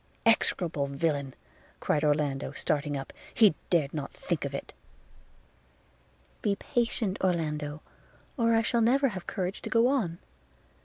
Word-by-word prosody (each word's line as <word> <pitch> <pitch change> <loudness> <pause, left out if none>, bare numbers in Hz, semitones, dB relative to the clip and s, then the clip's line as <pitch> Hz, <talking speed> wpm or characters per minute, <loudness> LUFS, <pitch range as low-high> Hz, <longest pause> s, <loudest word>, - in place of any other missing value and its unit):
'Execrable 175 -9 +2
villain!' 140 -2 -1 0.4
cried 150 - +1
Orlando, 145 -2 +1
starting 145 -1 -1
up 135 - -7
– - - -19
'he 215 -5 +6 0.2
dared 155 -5 +2
not 145 -3 -3
think - - -3
of - - -4
it.' - - -6 1.7
'Be 200 -1 +1
patient, 230 -2 -1
Orlando, 155 -4 -1 0.5
or 230 -3 +3
I 225 - +3
shall 235 0 +1
never 270 +4 +4
have 185 -5 -7
courage 185 +1 -3
to - - -5
go 230 +2 +4
on. 205 -12 0
170 Hz, 140 wpm, -29 LUFS, 145-225 Hz, 1.7 s, he